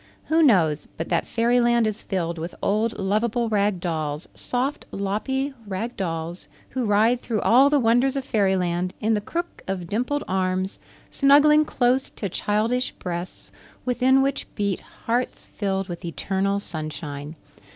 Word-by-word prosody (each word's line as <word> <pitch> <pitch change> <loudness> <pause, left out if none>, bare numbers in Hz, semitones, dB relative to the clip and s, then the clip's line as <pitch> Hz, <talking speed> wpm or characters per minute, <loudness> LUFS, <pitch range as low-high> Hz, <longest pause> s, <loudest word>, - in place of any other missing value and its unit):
Who 320 +1 +4
knows 170 - +3
but 165 - -4
that - - +1
Fairyland 235 0 +3
is 215 -1 -2
filled 170 -3 -2
with 165 +2 -5
old, 215 +3 +1
lovable 220 +4 0
Rag 205 -3 +1
Dolls 155 -3 -3
soft, 260 +4 -2
loppy 265 +8 -2
Rag 215 +5 -3
Dolls 170 -1 -4 0.2
who 250 -3 -1
ride 220 +4 +3
through 220 -3 -2
all 265 +4 +6
the 290 0 +3
wonders 245 +3 +3
of 270 -1 -2
Fairyland 185 -6 +1
in 220 +1 +1
the 210 - +1
crook 345 +10 -4
of 190 -2 -3
dimpled 250 +10 -1
arms, 185 0 -1 0.3
snuggling 300 +2 +6
close 255 -1 +1
to 200 - -5
childish 220 +7 0
breasts 175 0 -6 0.3
within 260 +2 +3
which 275 0 -1
beat 200 -3 0
hearts 240 +2 -3
filled 195 -2 -2
with 175 -2 -7
eternal 195 +4 -1
sunshine. 155 -3 -6
210 Hz, 145 wpm, -24 LUFS, 185-250 Hz, 0.3 s, all